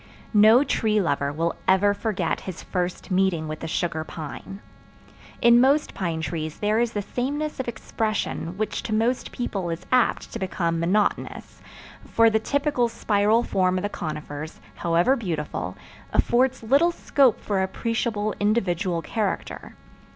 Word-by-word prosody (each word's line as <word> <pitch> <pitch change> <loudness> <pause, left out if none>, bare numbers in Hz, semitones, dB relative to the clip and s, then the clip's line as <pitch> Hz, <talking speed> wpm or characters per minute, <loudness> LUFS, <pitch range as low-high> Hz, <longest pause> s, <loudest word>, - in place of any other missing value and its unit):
No 220 +5 +7
tree 215 -6 +1
lover 140 -6 0
will 165 +3 -1
ever 195 +2 +4
forget 200 -5 -1
his 180 - -7
first 180 +1 -3
meeting 185 -4 +1
with 155 0 -5
the 165 - -5
sugar 160 -1 -1
pine. 160 +5 -8 0.8
In 235 0 +7
most 280 +3 +3
pine 165 -4 -2
trees 155 0 -4
there 210 +1 +1
is 235 -1 0
the 205 - -2
sameness 290 +8 -3
of 260 - -3
expression 215 -6 -3
which 215 0 -2
to 215 - -4
most 235 +3 0
people 195 -7 -3
is 165 0 -5
apt 250 -1 +2
to - - -4
become 170 -3 -1
monotonous, 190 +5 -1 0.4
for 230 0 +3
the 220 - +3
typical 280 0 0
spiral 215 +1 +2
form 185 -3 +1
of 205 +3 -2
conifers, 155 -1 -6
however 170 +10 +2
beautiful, 170 - -4 0.3
affords 255 +1 +2
little 280 +9 +4
scope 275 -7 +2
for 200 -2 -1
appreciable 215 +1 -1
individual 185 -5 0
character. 215 -4 -3
205 Hz, 145 wpm, -24 LUFS, 170-235 Hz, 0.8 s, No